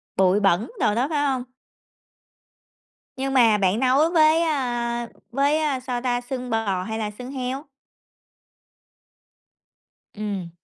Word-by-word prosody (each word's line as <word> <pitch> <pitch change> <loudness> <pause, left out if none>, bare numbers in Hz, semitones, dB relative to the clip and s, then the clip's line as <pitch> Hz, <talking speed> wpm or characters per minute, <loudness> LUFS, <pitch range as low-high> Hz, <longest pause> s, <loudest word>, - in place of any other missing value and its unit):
Bụi 190 +1 +3
bẩn 195 - +2
đồ 210 - +2
đó, 250 +4 +1
phải 290 -2 0
không? 260 -3 0 1.7
Nhưng 270 0 -2
mà 230 -5 +5
bạn 195 +2 +1
nấu 270 +5 +3
với, 315 -1 +5
a, 240 -6 -1 0.2
với, 285 +4 +2
a, 290 -4 0
sao 250 -1 -4
ta, 245 -1 0
xương 250 0 -5
bò 205 -5 -1
hay 220 +3 -4
là 210 -1 -3
xương 250 +1 -7
heo? 265 +2 -4 2.5
Ừm. 200 -4 -4
250 Hz, 130 wpm, -23 LUFS, 215-275 Hz, 2.5 s, mà